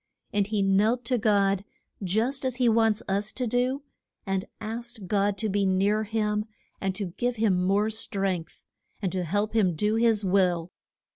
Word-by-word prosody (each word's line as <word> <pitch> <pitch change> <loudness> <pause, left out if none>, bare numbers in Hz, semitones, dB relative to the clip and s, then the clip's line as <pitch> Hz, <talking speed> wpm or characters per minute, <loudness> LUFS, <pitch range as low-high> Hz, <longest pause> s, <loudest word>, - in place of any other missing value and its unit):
And 205 -1 +2
he 210 -2 0
knelt 210 +6 +2
to 250 -2 +1
God, 200 -2 +2 0.4
just 225 +9 0
as 260 -2 -1
he 250 -1 +2
wants 225 -2 +3
us 200 +2 0
to 255 - -1
do, 250 +4 0 0.4
and 195 -1 -1
asked 225 -1 -5
God 200 +1 +1
to 220 - -1
be 200 0 +1
near 200 +3 +2
him 210 -1 0 0.4
and 190 -1 -1
to 190 -4 -4
give 245 0 0
him 200 -5 +2
more 200 +4 +2
strength, 195 -6 -3 0.3
and 190 -4 -2
to 185 -1 -1
help 205 +6 -1
him 215 -4 +4
to - - -8
do 210 +6 +1
his 225 -3 +3
will. 180 -3 +2
210 Hz, 175 wpm, -27 LUFS, 195-225 Hz, 0.4 s, him